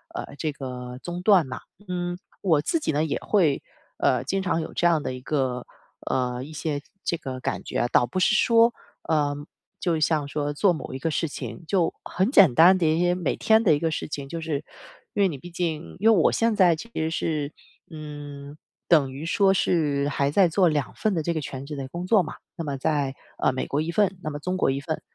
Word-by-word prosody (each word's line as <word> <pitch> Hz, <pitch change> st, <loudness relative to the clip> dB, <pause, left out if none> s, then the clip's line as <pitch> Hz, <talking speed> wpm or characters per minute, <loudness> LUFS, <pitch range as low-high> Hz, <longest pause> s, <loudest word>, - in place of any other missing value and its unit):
呃， -, -, -6 dB
这 155 Hz, -1 st, -2 dB
个 125 Hz, -2 st, -7 dB
中 175 Hz, 0 st, -5 dB
断 190 Hz, -6 st, +5 dB
嘛。 130 Hz, -1 st, -6 dB, 0.3 s
嗯， 175 Hz, 0 st, -2 dB, 0.2 s
我 160 Hz, -6 st, +2 dB
自 330 Hz, -, 0 dB
己 225 Hz, -, -1 dB
呢， 150 Hz, +2 st, +1 dB
也 155 Hz, -, -1 dB
会 165 Hz, -10 st, +2 dB, 0.4 s
呃， -, -, +2 dB
经 190 Hz, +8 st, -1 dB
常 180 Hz, -3 st, 0 dB
有 160 Hz, -, -7 dB
这 175 Hz, -, +2 dB
样 165 Hz, -4 st, +2 dB
的 -, -, -2 dB
一 130 Hz, -, -7 dB
个 130 Hz, -2 st, -1 dB, 0.4 s
呃， 125 Hz, -1 st, -1 dB
一 150 Hz, +4 st, -8 dB
些 150 Hz, -1 st, -2 dB, 0.2 s
这 170 Hz, -, -1 dB
个 130 Hz, -3 st, -6 dB
感 -, -, -3 dB
觉 -, -, -2 dB
啊， -, -, +2 dB
倒 -, -, +4 dB
不 155 Hz, +10 st, -3 dB
是 215 Hz, +3 st, +3 dB
说 230 Hz, 0 st, +5 dB, 0.4 s
呃， 145 Hz, -2 st, +2 dB, 0.4 s
就 165 Hz, -3 st, 0 dB
像 155 Hz, -2 st, +1 dB
说 145 Hz, 0 st, -2 dB
做 180 Hz, +4 st, +3 dB
某 155 Hz, -, -6 dB
一 130 Hz, -, -5 dB
个 165 Hz, +4 st, -1 dB
事 165 Hz, +2 st, 0 dB
情 125 Hz, -3 st, -7 dB
就 180 Hz, -4 st, +2 dB
很 190 Hz, +6 st, 0 dB
简 195 Hz, -, +6 dB
单 175 Hz, +7 st, +7 dB
的 175 Hz, -, +1 dB
一 160 Hz, +1 st, +2 dB
些 175 Hz, 0 st, +2 dB
每 180 Hz, -, -1 dB
天 220 Hz, 0 st, +3 dB
的 175 Hz, -8 st, +5 dB
一 145 Hz, -, +1 dB
个 165 Hz, -, 0 dB
事 155 Hz, -, -3 dB
情， 140 Hz, -2 st, -6 dB
就 165 Hz, -, -4 dB
是 160 Hz, -3 st, -1 dB, 0.6 s
因 200 Hz, -, +3 dB
为 -, -, +5 dB
你 150 Hz, -7 st, -5 dB
毕 175 Hz, -, -10 dB
竟 170 Hz, -2 st, -3 dB
因 220 Hz, +3 st, +5 dB
为 -, -, +4 dB
我 -, -, +4 dB
现 230 Hz, -1 st, +1 dB
在 180 Hz, -4 st, +5 dB
其 230 Hz, +9 st, -10 dB
实 160 Hz, 0 st, 0 dB
是 150 Hz, -3 st, -2 dB, 0.4 s
嗯， 145 Hz, -2 st, -9 dB, 0.3 s
等 145 Hz, -6 st, +4 dB
于 140 Hz, +4 st, -6 dB
说 195 Hz, +2 st, +3 dB
是 145 Hz, -6 st, +1 dB
还 140 Hz, 0 st, 0 dB
在 190 Hz, +2 st, +5 dB
做 180 Hz, +2 st, +3 dB
2 150 Hz, -4 st, -1 dB
份 215 Hz, -2 st, 0 dB
的 165 Hz, -, 0 dB
这 170 Hz, -, 0 dB
个 160 Hz, -, -2 dB
全 135 Hz, -1 st, -6 dB
职 150 Hz, -, -6 dB
的 135 Hz, -2 st, -5 dB
工 175 Hz, +5 st, -5 dB
作 210 Hz, 0 st, +5 dB
嘛。 155 Hz, -, -7 dB, 0.2 s
那 165 Hz, -, -5 dB
么 140 Hz, -1 st, -3 dB
在 140 Hz, -1 st, 0 dB, 0.2 s
呃 -, -, +2 dB
美 130 Hz, -, -2 dB
国 145 Hz, -, -1 dB
一 165 Hz, -, -2 dB
份， 195 Hz, +1 st, +1 dB
那 155 Hz, -, -2 dB
么 145 Hz, -, -5 dB
中 180 Hz, +5 st, -2 dB
国 -, -, +2 dB
一 135 Hz, -, -2 dB
份。 155 Hz, +2 st, -4 dB
160 Hz, 250 characters per minute, -25 LUFS, 145-180 Hz, 0.6 s, 单